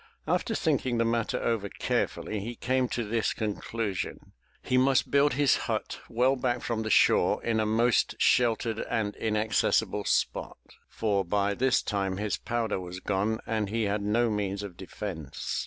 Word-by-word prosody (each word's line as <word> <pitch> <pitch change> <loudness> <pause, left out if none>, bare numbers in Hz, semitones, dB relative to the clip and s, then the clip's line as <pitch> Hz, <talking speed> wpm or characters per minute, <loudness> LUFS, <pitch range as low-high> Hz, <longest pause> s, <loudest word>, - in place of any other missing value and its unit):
After - - 0
thinking 125 -2 0
the 115 - +2
matter 115 -1 0
over 110 -4 -1
carefully 110 - -2
he 115 +4 -5
came 130 +2 0
to 120 - -2
this 110 +1 -1
con 105 -2 -2
clusion, 110 -5 -4
— - - -38
he 125 - 0
must 130 0 +3
build 140 0 +4
his 140 0 +3
hut - - -2
well 125 +4 +2
back 125 -2 -1
from 115 -1 -1
the 110 - -3
shore - - +4
in 115 -1 +1
a 110 - +1
most 115 +2 +2
sheltered 115 -2 +2
and 105 -2 -1
inaccessible 110 0 +1
spot, - - 0 0.3
for 100 -3 0
by 100 +2 0
this 130 +5 +2
time 95 -2 -1
his 105 0 -1
powder 115 -4 -2
was 90 0 -7
gone 105 +4 -1
and 110 -3 -1
he 115 +2 0
had 100 0 0
no 110 +3 +1
means 100 -1 -2
of 100 -4 -7
defence. 90 -5 -5
110 Hz, 170 wpm, -28 LUFS, 100-120 Hz, 0.3 s, build